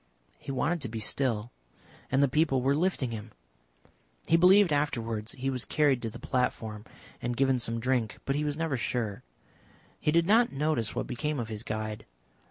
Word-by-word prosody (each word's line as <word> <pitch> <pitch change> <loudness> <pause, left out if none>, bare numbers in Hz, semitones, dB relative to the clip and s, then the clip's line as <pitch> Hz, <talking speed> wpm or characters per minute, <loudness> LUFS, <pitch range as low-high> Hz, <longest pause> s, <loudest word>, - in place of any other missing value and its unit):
He - - -6
wanted 150 +6 0
to 125 - -4
be 110 0 -4
still 115 0 0 0.6
and 135 +2 +4
the - - +5
people 135 -2 +2
were 135 +2 +3
lifting 155 -7 0
him. 110 -1 -7 0.9
He 165 - +3
believed 180 0 +6
afterwards 115 -7 -1
he 135 0 -2
was 125 -2 -2
carried 145 -5 +2
to 115 - -3
the - - -9
platform 110 -4 -2 0.4
and 120 0 -2
given 135 -1 +3
some 115 0 -1
drink, 125 -2 0
but 135 - 0
he 150 - 0
was 145 -1 -2
never 160 -5 -1
sure. 115 -3 -2 0.8
He 150 - +1
did 170 +1 +3
not 230 +5 +4
notice 145 -6 -1
what - - -1
became 150 +4 -2
of 115 -2 -4
his 110 -2 -5
guide. 110 -1 -4
130 Hz, 180 wpm, -29 LUFS, 115-150 Hz, 0.9 s, believed